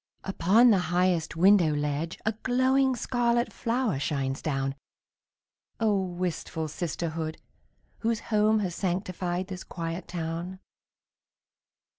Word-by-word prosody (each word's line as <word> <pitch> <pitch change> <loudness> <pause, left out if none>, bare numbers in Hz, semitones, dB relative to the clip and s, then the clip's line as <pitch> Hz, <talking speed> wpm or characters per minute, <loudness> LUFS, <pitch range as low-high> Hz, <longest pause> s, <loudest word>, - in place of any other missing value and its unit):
Upon 200 +6 +4
the 200 - +4
highest 175 -2 +1
window 175 -3 +5
ledge 150 +3 -2
A 220 - +3
glowing 260 +1 +3
scarlet 240 0 0
flower 235 - 0
shines 135 -1 -2
down. 135 -3 -1 1.1
Oh, 220 -2 +3
wistful 175 -3 -3
sisterhood, 160 0 -3 0.6
whose 230 -1 0
home 215 +1 +4
Has 185 -4 -2
sanctified 180 -1 -2
this 185 -1 -7
quiet 165 0 -5
town! 170 +2 -4
180 Hz, 105 wpm, -28 LUFS, 165-215 Hz, 1.1 s, window